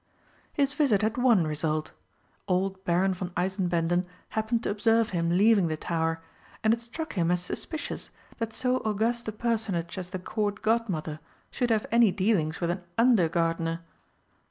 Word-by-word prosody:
His 280 Hz, -2 st, +1 dB
visit 255 Hz, -10 st, +2 dB
had 220 Hz, +1 st, +1 dB
one 235 Hz, -9 st, +4 dB
result. 155 Hz, 0 st, -1 dB, 0.6 s
Old 190 Hz, 0 st, 0 dB
Baron 185 Hz, +2 st, +2 dB
von 180 Hz, 0 st, -5 dB
Eisenbänden 175 Hz, -1 st, +1 dB, 0.2 s
happened 220 Hz, +1 st, -1 dB
to -, -, 0 dB
observe 225 Hz, +2 st, +3 dB
him 170 Hz, -2 st, 0 dB
leaving 205 Hz, -3 st, +5 dB
the 155 Hz, -1 st, -2 dB
tower, 165 Hz, 0 st, -1 dB, 0.4 s
and 220 Hz, 0 st, +5 dB
it 230 Hz, -, -1 dB
struck 315 Hz, +8 st, -6 dB
him 175 Hz, -4 st, +1 dB
as 180 Hz, 0 st, +2 dB
suspicious 315 Hz, -, -4 dB, 0.3 s
that 225 Hz, -1 st, -2 dB
so 250 Hz, +2 st, +1 dB
august 225 Hz, +2 st, 0 dB
a -, -, -1 dB
personage 215 Hz, -6 st, -2 dB
as 180 Hz, -1 st, -6 dB
the 185 Hz, -, -4 dB
Court 205 Hz, +2 st, -3 dB
Godmother 195 Hz, -9 st, 0 dB, 0.3 s
should 245 Hz, -2 st, -1 dB
have 220 Hz, -2 st, +2 dB
any 230 Hz, -3 st, +5 dB
dealings 185 Hz, -6 st, +1 dB
with 170 Hz, -1 st, 0 dB
an 180 Hz, +1 st, -4 dB
under 230 Hz, -8 st, +4 dB
gardener. 165 Hz, 0 st, 0 dB
195 Hz, 160 wpm, -28 LUFS, 170-225 Hz, 0.6 s, leaving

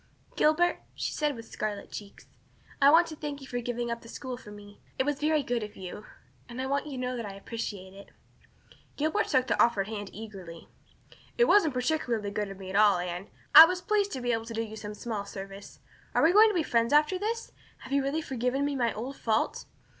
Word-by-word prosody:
"Gilbert," 340 Hz, +3 st, +3 dB, 0.2 s
she -, -, -2 dB
said, 300 Hz, -2 st, 0 dB
with 230 Hz, -1 st, -9 dB
scarlet 210 Hz, -2 st, -5 dB
cheeks, 200 Hz, -1 st, -9 dB, 0.6 s
"I 275 Hz, -, +8 dB
want 330 Hz, +3 st, +6 dB
to 310 Hz, -, -7 dB
thank 295 Hz, -2 st, -5 dB
you 270 Hz, -, -10 dB
for 245 Hz, -2 st, -4 dB
giving 240 Hz, 0 st, -3 dB
up 235 Hz, -, -4 dB
the -, -, -14 dB
school 255 Hz, +1 st, -6 dB
for 245 Hz, -4 st, -13 dB
me. 205 Hz, 0 st, -13 dB, 0.2 s
It 260 Hz, -, +1 dB
was 290 Hz, -1 st, -1 dB
very 305 Hz, -1 st, +2 dB
good 245 Hz, -2 st, -1 dB
of 210 Hz, -1 st, -7 dB
you 190 Hz, +3 st, -8 dB, 0.4 s
and 240 Hz, +1 st, -7 dB
I 260 Hz, -, -1 dB
want 280 Hz, +2 st, -1 dB
you 290 Hz, -, -6 dB
to -, -, -5 dB
know 250 Hz, 0 st, -2 dB
that 235 Hz, -2 st, -4 dB
I 195 Hz, -, -8 dB
appreciate 195 Hz, -2 st, -6 dB
it." 200 Hz, +1 st, -13 dB, 0.9 s
Gilbert 315 Hz, +9 st, +1 dB
took 260 Hz, -3 st, +2 dB
the -, -, +1 dB
offered 205 Hz, -5 st, +1 dB
hand 205 Hz, -2 st, -5 dB
eagerly. 190 Hz, -6 st, -10 dB, 0.7 s
"It 480 Hz, -, +5 dB
wasn't 330 Hz, -, +4 dB
particularly 245 Hz, -6 st, -1 dB
good 205 Hz, 0 st, -2 dB
of 195 Hz, -, -8 dB
me 190 Hz, -1 st, -8 dB
at -, -, -5 dB
all, 205 Hz, -2 st, +5 dB
Anne. 175 Hz, +2 st, -4 dB, 0.3 s
I 320 Hz, -, +13 dB
was 360 Hz, +2 st, -2 dB
pleased 405 Hz, +2 st, 0 dB
to 260 Hz, -, -4 dB
be 245 Hz, 0 st, 0 dB
able 225 Hz, -1 st, -1 dB
to 230 Hz, 0 st, -7 dB
do 225 Hz, -, -1 dB
you 220 Hz, -1 st, -8 dB
some 210 Hz, -1 st, -7 dB
small 215 Hz, -2 st, -4 dB
service. 195 Hz, 0 st, -9 dB, 0.4 s
Are -, -, +4 dB
we 330 Hz, +3 st, +5 dB
going 435 Hz, +2 st, +8 dB
to 420 Hz, -, -2 dB
be 340 Hz, -, +2 dB
friends 235 Hz, -2 st, +1 dB
after 300 Hz, +5 st, +4 dB
this? 455 Hz, +3 st, -3 dB, 0.3 s
Have 265 Hz, -, -7 dB
you 280 Hz, -, +3 dB
really 285 Hz, +4 st, -1 dB
forgiven 260 Hz, +1 st, -1 dB
me 285 Hz, -1 st, -1 dB
my 240 Hz, -3 st, +1 dB
old 255 Hz, +6 st, -6 dB
fault?" 220 Hz, -1 st, 0 dB
245 Hz, 230 wpm, -29 LUFS, 210-295 Hz, 0.9 s, I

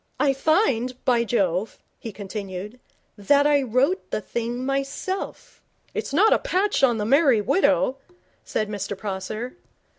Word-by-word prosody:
'I 280 Hz, -2 st, +3 dB
find, 265 Hz, -, +1 dB
by 240 Hz, -2 st, +3 dB
Jove,' 195 Hz, -3 st, 0 dB, 0.2 s
he 225 Hz, -, -7 dB
continued, 200 Hz, +2 st, -7 dB, 0.4 s
'that 280 Hz, +8 st, +3 dB
I 290 Hz, -1 st, +4 dB
wrote 265 Hz, -, 0 dB
the -, -, -1 dB
thing 235 Hz, +4 st, -4 dB
myself.' 275 Hz, +8 st, -4 dB, 0.3 s
'It's -, -, -4 dB
not 390 Hz, +10 st, +5 dB
a -, -, +2 dB
patch 410 Hz, -4 st, 0 dB
on 245 Hz, -4 st, +4 dB
The 210 Hz, -, -2 dB
Merry 270 Hz, -1 st, +4 dB
Widow,' 275 Hz, -, +2 dB, 0.5 s
said 215 Hz, -, -2 dB
Mr 200 Hz, -1 st, -4 dB
Prosser. 215 Hz, -, -5 dB
250 Hz, 140 wpm, -24 LUFS, 210-285 Hz, 0.5 s, not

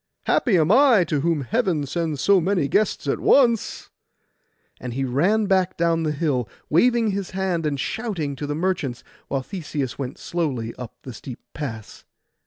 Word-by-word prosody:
Happy 220 Hz, -8 st, +2 dB
am 160 Hz, +2 st, +3 dB
I, 250 Hz, -5 st, +6 dB
to 155 Hz, -3 st, -1 dB
whom 165 Hz, -1 st, +1 dB
Heaven 170 Hz, -, 0 dB
sends 155 Hz, -1 st, -2 dB
so 200 Hz, +1 st, +4 dB
many 180 Hz, -4 st, +1 dB
guests 210 Hz, +10 st, +1 dB
at -, -, 0 dB
once!' 235 Hz, -5 st, +2 dB, 0.9 s
And 125 Hz, -2 st, -6 dB
he 135 Hz, 0 st, -1 dB
ran 180 Hz, -, +2 dB
back 190 Hz, -2 st, +1 dB
down 165 Hz, -1 st, +2 dB
the 155 Hz, -1 st, 0 dB
hill, 140 Hz, -, -1 dB, 0.2 s
waving 230 Hz, +6 st, +3 dB
his 195 Hz, -1 st, -3 dB
hand 180 Hz, -4 st, 0 dB
and 140 Hz, -2 st, -2 dB
shouting, 175 Hz, -, -3 dB
to 145 Hz, -, -4 dB
the 145 Hz, -, -2 dB
merchants, 160 Hz, -8 st, -2 dB, 0.2 s
while 135 Hz, -1 st, -2 dB
Theseus 145 Hz, -, -4 dB
went 135 Hz, -1 st, -4 dB
slowly 135 Hz, -10 st, -3 dB
up 125 Hz, -3 st, -9 dB
the 130 Hz, -, -8 dB
steep 125 Hz, +3 st, -9 dB
pass. 115 Hz, -8 st, -7 dB
165 Hz, 170 wpm, -23 LUFS, 140-195 Hz, 0.9 s, I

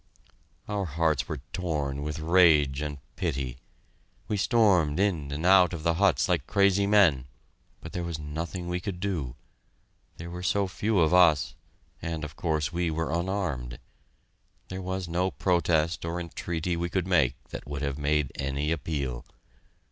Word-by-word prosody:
Our 105 Hz, -2 st, -2 dB
hearts 80 Hz, -4 st, 0 dB
were 75 Hz, -4 st, -4 dB
torn 75 Hz, -6 st, -2 dB
with 75 Hz, +2 st, -4 dB
rage 80 Hz, -4 st, +4 dB
and 75 Hz, -1 st, -4 dB, 0.2 s
pity. 70 Hz, -, -3 dB, 0.7 s
We 105 Hz, -, -1 dB
stormed 95 Hz, -, +3 dB
in 85 Hz, -8 st, 0 dB
and 75 Hz, +4 st, -3 dB
out 90 Hz, -1 st, +6 dB
of 80 Hz, -3 st, -5 dB
the 85 Hz, 0 st, +2 dB
huts 95 Hz, +1 st, +2 dB
like -, -, 0 dB
crazy 100 Hz, 0 st, +3 dB
men, 85 Hz, -11 st, +4 dB, 0.5 s
but -, -, -9 dB
there 90 Hz, -, -2 dB
was 85 Hz, -2 st, -3 dB
nothing 80 Hz, +4 st, -5 dB
we 90 Hz, 0 st, -1 dB
could 90 Hz, -1 st, -5 dB
do. 85 Hz, -11 st, -3 dB, 0.8 s
There 85 Hz, +1 st, -7 dB
were 90 Hz, 0 st, -6 dB
so 100 Hz, +2 st, +1 dB
few 105 Hz, +2 st, 0 dB
of 80 Hz, +1 st, +3 dB
us, 85 Hz, -5 st, +5 dB, 0.5 s
and 80 Hz, -1 st, -4 dB
of 75 Hz, -, -7 dB
course 80 Hz, 0 st, -1 dB
we 85 Hz, 0 st, 0 dB
were 80 Hz, 0 st, -2 dB
unarmed. 85 Hz, -9 st, -2 dB, 0.9 s
There 95 Hz, +1 st, -5 dB
was 95 Hz, 0 st, -3 dB
no 90 Hz, +2 st, 0 dB
protest 85 Hz, -3 st, +1 dB
or 85 Hz, +1 st, -3 dB
entreaty 85 Hz, 0 st, -3 dB
we 85 Hz, +1 st, -2 dB
could 90 Hz, 0 st, -1 dB
make 80 Hz, -9 st, +3 dB
that -, -, -8 dB
would 70 Hz, 0 st, -4 dB
have 70 Hz, 0 st, -2 dB
made 75 Hz, -1 st, +1 dB
any 70 Hz, +2 st, -2 dB
appeal. 70 Hz, -5 st, -3 dB
85 Hz, 160 wpm, -27 LUFS, 75-90 Hz, 0.9 s, out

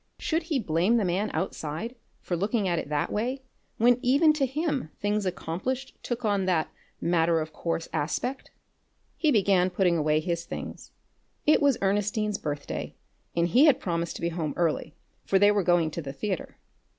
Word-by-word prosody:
Should 320 Hz, +1 st, 0 dB
he 320 Hz, -3 st, -1 dB
blame 190 Hz, +1 st, +2 dB
the 215 Hz, -, +1 dB
man 185 Hz, +4 st, 0 dB
outside 185 Hz, +5 st, -3 dB, 0.3 s
for 175 Hz, -, -2 dB
looking 200 Hz, +3 st, 0 dB
at 170 Hz, -2 st, +1 dB
it -, -, -6 dB
that 150 Hz, +2 st, -1 dB
way 255 Hz, +5 st, -2 dB, 0.3 s
when 240 Hz, +2 st, +4 dB
even 285 Hz, +5 st, +5 dB
to 280 Hz, -3 st, +1 dB
him 290 Hz, -, -2 dB
things 205 Hz, -1 st, 0 dB
accomplished 195 Hz, +10 st, -3 dB
took 240 Hz, -1 st, -3 dB
on 200 Hz, -2 st, +1 dB
that 175 Hz, -4 st, +1 dB, 0.3 s
matter 170 Hz, -1 st, +2 dB
of 155 Hz, 0 st, -5 dB
course 165 Hz, -1 st, -2 dB
aspect? 250 Hz, -, -2 dB, 0.7 s
He 315 Hz, -, +1 dB
began 195 Hz, -6 st, +3 dB
putting 180 Hz, -2 st, +2 dB
away 155 Hz, 0 st, +2 dB
his 170 Hz, +1 st, -2 dB
things. -, -, -7 dB, 0.6 s
It 305 Hz, -, +5 dB
was 280 Hz, -4 st, +4 dB
Ernestine's 205 Hz, +1 st, 0 dB
birthday, 145 Hz, -1 st, -4 dB, 0.4 s
and 170 Hz, 0 st, +2 dB
he 255 Hz, -, +6 dB
had 290 Hz, -5 st, +5 dB
promised 170 Hz, -1 st, -2 dB
to -, -, -7 dB
be 170 Hz, -, +1 dB
home 160 Hz, -3 st, -3 dB
early, 160 Hz, -2 st, 0 dB, 0.3 s
for 195 Hz, -, +2 dB
they 205 Hz, +1 st, +6 dB
were 205 Hz, -1 st, +2 dB
going 175 Hz, -3 st, +2 dB
to 170 Hz, -, -4 dB
the 135 Hz, -3 st, -6 dB
theatre. 195 Hz, +1 st, -4 dB
190 Hz, 175 wpm, -27 LUFS, 170-240 Hz, 0.7 s, he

